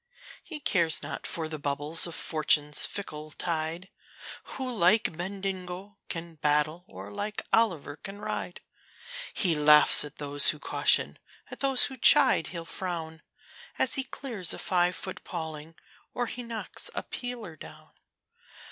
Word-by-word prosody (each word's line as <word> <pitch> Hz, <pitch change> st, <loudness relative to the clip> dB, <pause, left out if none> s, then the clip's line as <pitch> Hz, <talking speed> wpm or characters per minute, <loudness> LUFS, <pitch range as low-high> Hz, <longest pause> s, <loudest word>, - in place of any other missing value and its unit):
He 315 Hz, -3 st, -3 dB
cares 170 Hz, -, +1 dB
not -, -, -6 dB
for 160 Hz, -1 st, -4 dB
the 155 Hz, -1 st, -7 dB
bubbles 145 Hz, +4 st, +2 dB
of 170 Hz, -, -7 dB
Fortune's 150 Hz, -1 st, +2 dB
fickle 155 Hz, -6 st, -7 dB
tide, 165 Hz, +2 st, -4 dB, 0.7 s
Who 260 Hz, -2 st, -3 dB
like 190 Hz, -3 st, +2 dB
Bendigo 190 Hz, +1 st, -6 dB
can 165 Hz, -1 st, -6 dB
battle, 150 Hz, +3 st, 0 dB
and 100 Hz, +2 st, -11 dB
like 210 Hz, -, -5 dB
Olliver 165 Hz, -10 st, +1 dB
can 195 Hz, +1 st, -8 dB
ride. -, -, -6 dB, 0.7 s
He 180 Hz, -5 st, +3 dB
laughs 150 Hz, 0 st, +6 dB
at 150 Hz, -1 st, -9 dB
those 145 Hz, -1 st, +5 dB
who 155 Hz, -, -1 dB
caution, -, -, +2 dB, 0.3 s
at -, -, -9 dB
those 270 Hz, -2 st, +3 dB
who 265 Hz, -, -2 dB
chide 260 Hz, -, +6 dB
he'll 170 Hz, -2 st, -7 dB
frown, 165 Hz, -2 st, -5 dB, 0.6 s
As -, -, +2 dB
he 270 Hz, -, 0 dB
clears 235 Hz, -9 st, -2 dB
a -, -, -10 dB
five 180 Hz, -1 st, +1 dB
foot 190 Hz, -, -7 dB
paling, 160 Hz, -2 st, -7 dB, 0.4 s
or 245 Hz, -, -1 dB
he 245 Hz, -, -7 dB
knocks 230 Hz, -2 st, -5 dB
a -, -, -3 dB
peeler 240 Hz, -9 st, -7 dB
down. -, -, -14 dB
170 Hz, 145 wpm, -27 LUFS, 155-205 Hz, 0.7 s, laughs